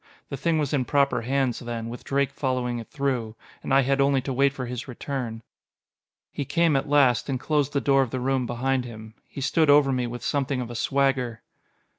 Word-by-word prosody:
The - - -4
thing 160 +4 +1
was 150 -2 -1
in 135 -3 +2
proper 140 -3 +2
hands, 130 0 0
then, 120 -2 -5
with 120 +1 -8
Drake 140 0 0
following 125 -3 -2
it 115 - -9
through. 130 -6 -2 0.3
And - - -5
I 135 +1 +6
had 135 +1 +1
only 140 0 +3
to 135 +1 -4
wait 140 +2 +3
for 130 -2 -5
his 125 +2 -6
return. 125 -3 -5 0.9
He - - -3
came 155 +3 +2
at 135 - 0
last, 140 -4 +3
and 130 -2 -1
closed 145 -1 0
the 140 - +1
door 135 -1 +4
of 130 - 0
the 130 - -3
room 130 -1 0
behind 130 +2 0
him. 110 -2 -10
He 140 - -8
stood 155 +3 +2
over 145 -1 +6
me 125 -2 0
with 120 0 -7
something 140 -2 -1
of 120 -1 -4
a - - -7
swagger. 130 -3 0
135 Hz, 215 wpm, -25 LUFS, 120-140 Hz, 0.9 s, I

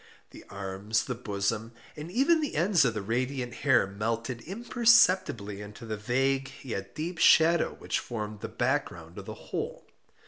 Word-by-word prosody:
The - - -12
arms, 100 +2 -2
the 125 - -3
bosom, 110 0 -2 0.2
and 150 +2 -7
even 300 - +3
the 295 - -3
ends 175 -2 +3
of 115 -3 0
the 105 - -3
radiant 125 +3 -2
hair 130 -4 +3
melted 115 +5 -3
imperceptibly 190 - +3
into 105 +3 -10
the 110 -1 -3
vague 135 +5 0
yet 100 -6 -5
deep 165 +2 -4
shadow 165 +1 +5
which - - -2
formed 105 -3 -5
the 115 - -6
back 130 +5 +1
ground 85 0 -11
of - - -9
the - - -6
whole. - - -5
120 Hz, 165 wpm, -28 LUFS, 105-155 Hz, 0.2 s, shadow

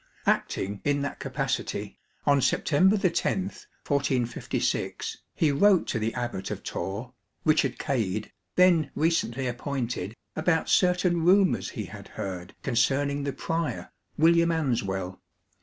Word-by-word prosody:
Acting 100 +1 0
in 145 -1 +1
that 145 - -4
capacity, 135 -7 -3 0.3
on 140 -1 +4
September 185 +10 +3
10, 190 -1 +1 0.4
1456, 135 -4 -1 0.2
he 155 -3 +3
wrote 190 +6 +4
to 115 - 0
the 110 +1 0
Abbot 120 -6 -3
of - - -5
Torre, 100 +8 -4 0.3
Richard 140 -5 +3
Cade, 110 -6 -2 0.2
then 180 -4 +5
recently 140 -6 +1
appointed, 120 -5 -3 0.2
about 160 +1 +1
certain 180 -2 +3
rumours 190 +2 +4
he - - -5
had - - -10
heard 90 -1 -5
concerning 140 +4 +1
the 140 - -2
prior, 165 -1 -3 0.3
William 170 +1 +5
Answell. 100 - -1
140 Hz, 120 wpm, -27 LUFS, 115-165 Hz, 0.4 s, then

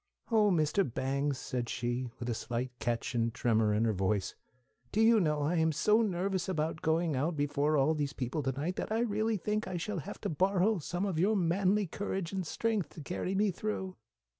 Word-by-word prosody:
"Oh, 215 -2 +5
Mr. 160 +1 +2
Bangs," 140 +3 -1
said 125 -3 -3
she, 120 +1 -2
with 120 - -5
a 120 - 0
slight 120 +3 -3
catch 120 +2 -2
and 115 -1 +1
tremor 110 -2 +2
in 105 +2 +2
her 110 - +2
voice, 95 +1 0 0.6
"do 215 - -1
you 225 0 +6
know 150 -5 +1
I 165 +4 +1
am 160 0 +3
so 210 +9 +3
nervous 190 -2 -1
about 160 -2 -1
going 160 -1 +1
out 155 +6 0
before 145 +1 +1
all 140 +3 +3
those 145 -2 -1
people 135 +4 -2
to 135 -1 0
night 150 +8 -3
that - - -3
I 225 +1 +1
really 220 -1 0
believe 210 +3 -2
I 180 - -3
shall 185 +2 -3
have 145 - -7
to - - -2
borrow 190 +5 +2
some 175 +5 -2
of 185 -6 -1
your 205 +5 +3
manly 195 +3 +2
courage 190 0 -4
and 190 -3 -2
strength 220 -3 -1
to 160 - -8
carry 180 +4 -3
me 205 0 +3
through!" 190 -1 -4
165 Hz, 210 wpm, -32 LUFS, 135-195 Hz, 0.6 s, you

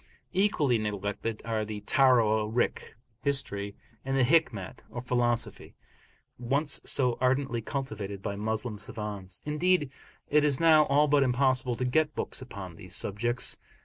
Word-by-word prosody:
Equally 155 - +2
neglected 105 +1 -3
are 110 -2 -1
the 105 -1 -6
Tawarikh 115 -4 +2 0.3
(history) 100 -8 -2 0.3
and 135 0 -1
the 130 - +4
Hikmat 120 - +1
(or 120 - -6
philosophy), 120 -1 -1 0.6
once 140 +5 0
so 125 -3 +1
ardently 130 -2 +1
cultivated 110 -7 -5
by 100 - -3
Moslem 110 +1 -3
savans; 105 -4 -5
indeed, 150 -1 +1 0.4
it 150 0 +3
is 145 -3 +2
now 155 -2 +6
all 145 +2 +3
but 145 -1 +4
impossible 130 -1 +2
to 125 - -2
get 150 +4 +1
books - - -3
upon 95 -9 -8
these 90 0 -6
subjects. 120 +5 0
125 Hz, 135 wpm, -29 LUFS, 105-140 Hz, 0.6 s, now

